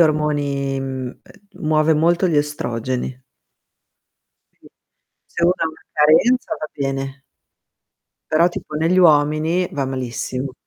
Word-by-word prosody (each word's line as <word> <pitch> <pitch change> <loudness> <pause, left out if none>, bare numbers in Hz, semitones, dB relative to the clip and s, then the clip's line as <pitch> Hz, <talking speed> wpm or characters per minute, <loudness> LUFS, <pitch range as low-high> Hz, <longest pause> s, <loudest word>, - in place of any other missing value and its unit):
ormoni, 145 -3 +1
mhmm, 130 -1 -4
ehm, 200 - -19 0.2
muove 155 +1 +2
molto 170 +4 +2
gli 160 - +1
estrogeni. 130 -3 -2 1.3
Sì, - - -22 0.6
se - - -5
uno 175 - +5
ha 165 - 0
una 160 - -15
carenza, 160 +12 +3
va 155 - -4
bene. 135 -1 -4 1.1
Però 170 +3 +5
tipo 155 -3 -7
negli 165 +4 +1
uomini, 155 +2 +3
va 140 -2 -1
malissimo. 130 0 -4
150 Hz, 120 wpm, -20 LUFS, 135-160 Hz, 1.3 s, uno